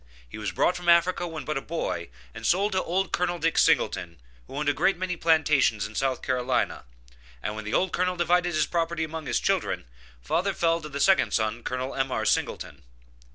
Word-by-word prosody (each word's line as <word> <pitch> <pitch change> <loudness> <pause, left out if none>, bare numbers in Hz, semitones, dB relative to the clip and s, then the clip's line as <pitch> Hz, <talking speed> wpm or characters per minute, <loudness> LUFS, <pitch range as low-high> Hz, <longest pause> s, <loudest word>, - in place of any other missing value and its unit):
He - - -9
was 105 -2 -3
brought 180 - +2
from 175 -1 -2
Africa 175 +1 +4
when 160 -2 -6
but 150 -2 -1
a - - -11
boy, 135 - -3 0.2
and - - -9
sold 200 +4 +2
to 185 - +1
old 185 +2 -1
Colonel 175 0 0
Dick 165 0 0
Singleton, 85 -3 +1 0.3
who - - -10
owned 150 +1 -2
a 145 - +4
great 190 +5 +2
many 180 0 -2
plantations 150 -10 +2
in 105 - -8
South 130 +1 -1
Carolina, 130 - -1 0.6
and 105 - -3
when 110 -1 -6
the 105 - -2
old 185 -1 +1
colonel 180 0 0
divided 175 0 +1
his 155 -1 +3
property 165 -1 -1
among 160 -1 -5
his - - +1
children, - - -1 0.3
father 175 - -1
fell 165 0 +1
to 155 - -8
the 140 0 -5
second 190 +6 +3
son, 110 +1 0
Col. 125 +2 -3
M.R. 135 -5 -1
Singleton. 70 -8 -1
160 Hz, 200 wpm, -26 LUFS, 125-175 Hz, 0.6 s, Africa